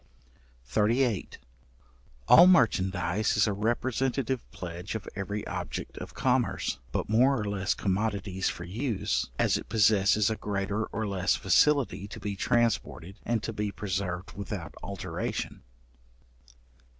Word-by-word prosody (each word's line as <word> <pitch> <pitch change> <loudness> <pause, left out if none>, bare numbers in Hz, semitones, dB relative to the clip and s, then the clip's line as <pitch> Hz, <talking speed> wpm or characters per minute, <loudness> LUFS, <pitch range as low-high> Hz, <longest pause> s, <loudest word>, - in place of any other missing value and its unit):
§38. 115 -1 +1 0.9
All 175 - +9
merchandize 100 - +2
is 105 - +5
a 105 - 0
representative 125 +4 -1
pledge 90 +3 -6
of 110 - -5
every 100 +1 -4
object - - -5
of - - -9
commerce, - - 0
but - - -2
more 125 +5 +4
or 105 - -2
less 100 -2 -1
commodities 100 -1 -1
for 85 - -6
use, 110 - -1
as - - +2
it - - -9
possesses 105 -1 +4
a - - 0
greater 105 +1 -2
or 110 +1 -4
less 95 -2 +1
facility 125 +1 +2
to - - -9
be 100 -1 -4
transported, 115 -4 0
and 115 -2 0
to 115 - -3
be 105 -1 -2
preserved 95 -3 -3
without 100 -3 -6
alteration. - - -4
105 Hz, 125 wpm, -28 LUFS, 95-115 Hz, 0.9 s, All